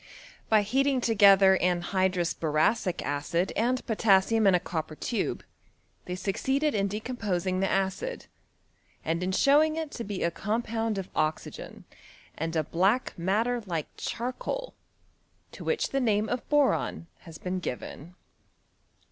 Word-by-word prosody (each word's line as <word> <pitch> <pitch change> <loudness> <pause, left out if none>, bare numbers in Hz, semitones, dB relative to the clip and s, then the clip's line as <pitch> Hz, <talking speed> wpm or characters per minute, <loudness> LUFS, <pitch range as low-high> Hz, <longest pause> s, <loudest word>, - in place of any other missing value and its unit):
By 215 -2 +5
heating 270 +5 +1
together 200 -4 +6
anhydrous 180 0 +1
boracic 165 +5 0
acid 145 +6 -1
and 250 +3 0
potassium 215 -1 +3
in 190 - +6
a - - +3
copper 160 -3 -4
tube, 230 +8 -2 0.6
they 180 - -4
succeeded 265 +10 0
in 200 -1 +1
de 205 +2 -3
composing 195 -7 -2
the 195 - +1
acid, 195 - -2 0.8
and 165 +2 -1
in 185 +1 -1
showing 295 +9 +4
it 320 -2 -4
to 235 - -5
be 200 -3 -4
a 170 - +1
com 215 +7 -2
pound 225 -2 -2
of 190 -1 -4
oxygen, 155 0 -3 0.5
and 165 +1 -3
a 160 - +2
black 195 - +1
matter 220 +8 0
like 165 -4 -3
cheur 240 +2 -3
coal, - - -5 0.8
to - - -10
which 465 - 0
the 275 - 0
name 215 -3 +2
of 245 0 -3
boron 290 - +1
has 165 -3 -12
been 185 +2 -4
gjiven. 155 +4 -6
195 Hz, 145 wpm, -28 LUFS, 180-240 Hz, 0.8 s, together